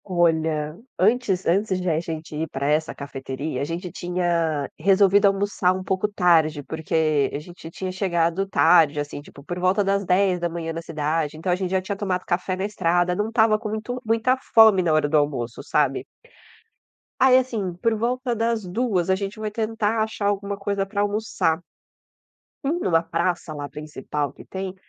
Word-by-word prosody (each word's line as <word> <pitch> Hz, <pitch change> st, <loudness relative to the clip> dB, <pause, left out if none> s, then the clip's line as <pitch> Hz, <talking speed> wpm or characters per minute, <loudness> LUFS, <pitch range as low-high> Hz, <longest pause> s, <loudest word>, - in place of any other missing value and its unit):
Olha, 160 Hz, -4 st, +1 dB, 0.2 s
antes 205 Hz, -2 st, +2 dB
antes 190 Hz, +2 st, +1 dB
de 180 Hz, -, -4 dB
a 160 Hz, -1 st, +1 dB
gente 160 Hz, -2 st, -6 dB
ir 160 Hz, +1 st, -3 dB
pra 135 Hz, +1 st, -3 dB
essa 155 Hz, +2 st, +1 dB
cafeteria, 140 Hz, +1 st, -5 dB
a -, -, 0 dB
gente 170 Hz, +4 st, -4 dB
tinha 170 Hz, -4 st, -1 dB
resolvido 200 Hz, +1 st, +5 dB
almoçar 195 Hz, -2 st, +1 dB
um 185 Hz, -, -5 dB
pouco 190 Hz, +2 st, 0 dB
tarde, 160 Hz, -6 st, +3 dB
porque 160 Hz, -2 st, 0 dB
a -, -, -1 dB
gente 175 Hz, +4 st, -12 dB
já 165 Hz, -, -7 dB
tinha 185 Hz, +2 st, -5 dB
chegado 185 Hz, 0 st, 0 dB
tarde, 160 Hz, -3 st, +4 dB
assim, 145 Hz, 0 st, -5 dB
tipo, 140 Hz, -1 st, -15 dB
por 175 Hz, +4 st, -5 dB
volta 185 Hz, +3 st, +2 dB
das 200 Hz, 0 st, +1 dB
10:00 175 Hz, -3 st, 0 dB
na 165 Hz, -, -5 dB
cidade, 155 Hz, -1 st, -2 dB
então 180 Hz, +3 st, -2 dB
a -, -, +3 dB
gente 185 Hz, 0 st, -3 dB
já 190 Hz, 0 st, +1 dB
tinha 195 Hz, +2 st, -4 dB
tomado 190 Hz, -2 st, -2 dB
café 180 Hz, +1 st, -1 dB
na 190 Hz, +1 st, -2 dB
estrada, 175 Hz, -3 st, +1 dB
não 210 Hz, +3 st, -1 dB
estava 220 Hz, -2 st, +3 dB
com 215 Hz, -, -5 dB
muito 220 Hz, +4 st, -4 dB
muita 230 Hz, +3 st, +2 dB, 0.2 s
fome 220 Hz, -4 st, +8 dB
na 170 Hz, -3 st, +1 dB
hora 155 Hz, -1 st, +3 dB
do 155 Hz, +1 st, +2 dB
almoço, 130 Hz, -5 st, -1 dB
sabe. 140 Hz, -3 st, +1 dB, 1.2 s
Aí, 260 Hz, -1 st, +6 dB
assim, 225 Hz, -8 st, -1 dB
por 225 Hz, +6 st, 0 dB
volta 245 Hz, +2 st, -1 dB
das 225 Hz, -2 st, -1 dB
14:00 190 Hz, -2 st, -1 dB
a 190 Hz, -, +4 dB
gente 200 Hz, +2 st, -4 dB
foi 215 Hz, -1 st, -4 dB
tentar 220 Hz, 0 st, -1 dB
achar 220 Hz, -2 st, -3 dB
alguma 200 Hz, 0 st, -1 dB
coisa 200 Hz, -1 st, -1 dB
pra 200 Hz, +1 st, -2 dB
almoçar. 205 Hz, -5 st, 0 dB, 1.0 s
Indo 310 Hz, -, -1 dB
na 165 Hz, 0 st, +4 dB
praça 170 Hz, -1 st, -2 dB
lá 145 Hz, -1 st, -5 dB
principal 150 Hz, -1 st, -4 dB
que -, -, -14 dB
tem, 190 Hz, 0 st, -5 dB
180 Hz, 180 wpm, -23 LUFS, 160-205 Hz, 1.2 s, fome